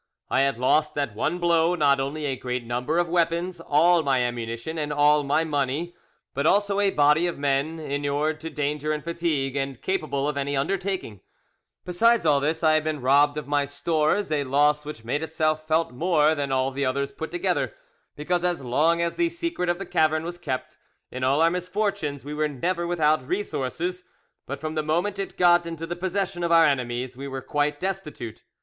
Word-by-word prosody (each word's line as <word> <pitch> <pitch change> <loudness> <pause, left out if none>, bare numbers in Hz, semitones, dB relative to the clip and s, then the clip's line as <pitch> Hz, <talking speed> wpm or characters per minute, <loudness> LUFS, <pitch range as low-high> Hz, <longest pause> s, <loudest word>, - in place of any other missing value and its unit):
I 130 - +3
had 140 -3 +1
lost 150 +5 +2
at 140 -6 -1
one 115 +11 -1
blow 170 0 +2
not 140 -4 +3
only 145 +3 -3
a 135 -2 -1
great 125 -1 -4
number 125 +7 -1
of 175 0 +2
weapons, 170 +1 0
all 165 +3 +4
my 135 -3 +1
ammunition, 120 +5 -3
and 150 -1 -2
all 150 0 +4
my 145 +3 +1
money, 150 +2 -1 0.4
but 140 +2 0
also 200 +2 +2
a 200 -1 +3
body 150 +1 +3
of 175 - -4
men, 140 +3 0
inured 145 +1 -1
to 160 +1 -6
danger 150 0 -2
and 150 - -4
fatigue, 165 -5 -1
and 135 -2 -3
capable 155 -7 -1
of 150 -1 -2
any 140 0 -1
undertaking;—besides 185 - -2
all 145 -2 +4
this, 155 +4 -1
I 155 -1 +5
had 155 0 +2
been 155 -1 -2
robbed 145 +3 +3
of 150 - -5
my 145 -1 +1
stores—a 155 +3 0
loss 145 +2 +2
which 150 -7 -8
made 145 +6 -1
itself 155 -1 -1
felt 160 -1 +1
more 155 +2 +2
than 140 -3 -2
all 130 0 +1
the 140 +1 -3
others 140 +1 -1
put 160 +3 -6
together, 345 +7 -1 0.4
because 175 +4 -1
as 175 -5 -1
long 160 +7 +2
as 170 - -2
the 340 -1 +2
secret 335 - -3
of 175 - +1
the 195 - -6
cavern 155 -1 +1
was 175 +1 -6
kept, 130 -7 -5 0.3
in 130 0 -5
all 140 +5 +3
our 165 - +4
misfortunes 180 -6 -2
we 145 - -5
were 155 0 0
never 170 +5 -2
without 155 -5 +1
resources; 180 0 -3 0.4
but 140 0 -5
from 155 +1 -4
the 155 - 0
moment 175 +6 -1
it 195 - -5
got 175 -1 +4
into 165 -1 -5
the 175 - -4
possession 185 0 -2
of 170 - 0
our 165 -1 +7
enemies 125 -2 -1
we 140 +2 -7
were 135 -1 -6
quite 145 0 -1
destitute. 175 - -5
155 Hz, 195 wpm, -25 LUFS, 140-170 Hz, 0.4 s, our